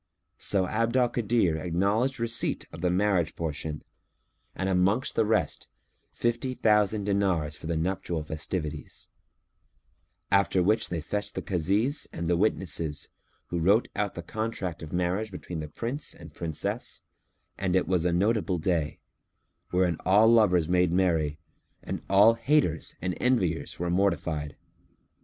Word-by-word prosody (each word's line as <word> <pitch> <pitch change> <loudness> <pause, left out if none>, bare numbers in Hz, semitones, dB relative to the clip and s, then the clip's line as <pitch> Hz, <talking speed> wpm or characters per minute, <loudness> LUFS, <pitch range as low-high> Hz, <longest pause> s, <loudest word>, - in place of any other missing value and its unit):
So 95 -2 +2
Abd 115 +5 0
al 125 -1 +4
Kadir 110 -9 +1
acknowledged 100 +11 0
receipt 115 0 -1
of - - -9
the 90 - +2
marriage 90 -2 +1
portion 75 -1 -4 0.7
and 95 - -2
amongst 95 +6 +2
the 110 -2 +2
rest, 110 0 0 0.4
fifty 120 +2 -1
thousand 105 -2 +3
dinars 95 -7 0
for 80 - -9
the 85 -1 -1
nuptial 85 -1 -2
festivities; 80 0 -5 1.2
after 100 -2 +3
which 105 +5 +2
they 85 -2 -2
fetched 105 +5 -3
the - - -3
Kazis 100 - +1
and 85 0 -4
the 85 - +3
witnesses, 85 -6 -1 0.4
who 85 - -1
wrote 100 +8 +3
out 105 -1 -1
the 85 - -6
contract 100 -4 -4
of 80 -1 -8
marriage 90 +5 -1
between 90 -3 -6
the 75 - -5
Prince 120 - -4
and 80 -2 -12
Princess, 80 -3 -3 0.5
and 95 -2 -1
it 95 - +2
was 90 -3 +2
a 90 - +2
notable 100 +1 +1
day, 80 -2 -1 0.7
wherein 90 -3 +1
all 105 +4 +5
lovers 100 -8 +4
made 90 0 +3
merry 80 -5 +1 0.5
and - - -4
all 100 +4 +7
haters 115 - +1
and 90 0 0
enviers 95 -10 0
were 85 0 -2
mortified. 85 -6 0
90 Hz, 145 wpm, -28 LUFS, 85-105 Hz, 1.2 s, all